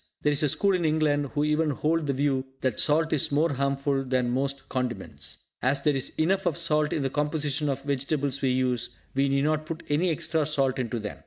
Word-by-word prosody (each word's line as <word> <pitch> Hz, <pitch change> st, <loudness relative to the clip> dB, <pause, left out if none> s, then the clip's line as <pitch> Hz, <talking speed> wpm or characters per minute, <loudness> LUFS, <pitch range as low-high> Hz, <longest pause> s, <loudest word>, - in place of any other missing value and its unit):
There 150 Hz, -, +3 dB
is 145 Hz, -, +1 dB
a 150 Hz, -, +3 dB
school 200 Hz, +7 st, +2 dB
in 180 Hz, -2 st, 0 dB
England 155 Hz, -2 st, +2 dB
who 145 Hz, -, +2 dB
even 150 Hz, +1 st, +2 dB
hold 155 Hz, +2 st, 0 dB
the 140 Hz, -, +1 dB
view 135 Hz, -1 st, 0 dB
that 130 Hz, -5 st, 0 dB
salt 160 Hz, +2 st, +3 dB
is 145 Hz, -, +2 dB
more 150 Hz, +2 st, +2 dB
harmful 140 Hz, 0 st, 0 dB
than 125 Hz, -2 st, 0 dB
most 135 Hz, +2 st, -2 dB
condiments. 125 Hz, -2 st, -4 dB, 0.2 s
As 135 Hz, +2 st, +1 dB
there 145 Hz, 0 st, +2 dB
is 135 Hz, -, -2 dB
enough 190 Hz, +4 st, +1 dB
of 170 Hz, -, 0 dB
salt 155 Hz, -3 st, +1 dB
in 145 Hz, -, -1 dB
the 135 Hz, -, 0 dB
composition 150 Hz, 0 st, 0 dB
of 135 Hz, -, -2 dB
the 140 Hz, -, -7 dB
vegetables 140 Hz, 0 st, -1 dB
we 135 Hz, -, +2 dB
use, 125 Hz, -2 st, 0 dB, 0.2 s
we 135 Hz, +1 st, +2 dB
need 140 Hz, 0 st, +2 dB
not 155 Hz, +1 st, 0 dB
put 165 Hz, +1 st, -5 dB
any 160 Hz, +5 st, +2 dB
extra 160 Hz, -1 st, 0 dB
salt 135 Hz, -3 st, +1 dB
into 120 Hz, -1 st, -2 dB
them. 105 Hz, -2 st, -6 dB
145 Hz, 225 wpm, -27 LUFS, 135-155 Hz, 0.2 s, There